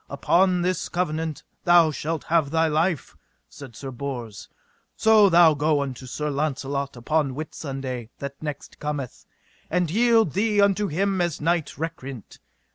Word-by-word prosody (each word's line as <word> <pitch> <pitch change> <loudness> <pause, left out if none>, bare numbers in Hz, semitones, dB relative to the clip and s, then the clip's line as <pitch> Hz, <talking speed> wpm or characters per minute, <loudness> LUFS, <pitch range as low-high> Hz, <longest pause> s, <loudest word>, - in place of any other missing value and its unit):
Upon 180 +5 +2
this 185 +1 -1
covenant 160 -3 -2 0.2
thou 175 -2 +5
shalt 155 +1 -3
have 160 -4 +1
thy 165 +1 +2
life, 160 0 0 0.3
said 135 -5 -12
Sir 135 +2 -7
Bors, 120 -5 -6 0.5
so 220 -2 +5
thou 170 -2 +6
go 150 0 +1
unto 135 -2 -5
Sir 150 +4 -3
Launcelot 140 -1 -2
upon 140 +2 0
Whitsunday 135 -5 -5
that 140 0 -7
next 150 -2 -7
cometh, 145 -4 -5 0.4
and 175 -2 0
yield 225 -3 +3
thee 210 +1 +1
unto 200 0 +3
him 190 +3 0
as 175 -3 -1
knight 165 0 -1
recreant. 140 -7 -7
155 Hz, 140 wpm, -24 LUFS, 140-175 Hz, 0.5 s, thou